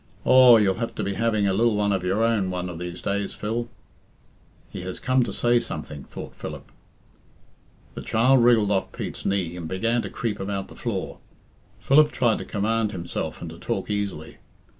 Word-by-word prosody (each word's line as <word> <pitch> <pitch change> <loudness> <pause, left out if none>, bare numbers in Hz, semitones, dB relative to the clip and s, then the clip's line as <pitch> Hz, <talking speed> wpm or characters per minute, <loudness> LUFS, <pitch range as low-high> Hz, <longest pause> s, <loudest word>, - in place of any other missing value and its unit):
Aw, 130 -2 +8
you'll 95 -3 +2
have 115 - -3
to - - -3
be 100 - -2
having 110 0 +1
a 95 - +2
lil 115 +2 +2
one 105 0 +1
of 95 -2 -1
your 95 +5 +1
own 110 -5 +1
one 90 0 -3
of 85 -2 -7
these 90 0 -7
days, 100 0 -2
Phil." 115 +3 -3 1.0
"He 95 - -6
has 90 0 -6
come 130 0 +2
to 120 - -1
say 120 0 +2
something," 75 - -6
thought - - -9
Philip. - - -8 1.2
The - - -7
child 125 +3 +3
wriggled 115 -4 +4
off 95 -2 0
Pete's - - -5
knee 95 -3 -1
and 85 -2 -6
began 115 +7 0
to 100 - -6
creep 105 0 -3
about 95 0 -4
the - - -12
floor. - - -4 0.6
Philip 150 +2 +4
tried 120 -3 +1
to - - -6
command 110 +1 0
himself 85 -2 -5
and - - -6
to - - -12
talk - - -3
easily. 100 -6 -4
105 Hz, 190 wpm, -24 LUFS, 95-115 Hz, 1.2 s, Aw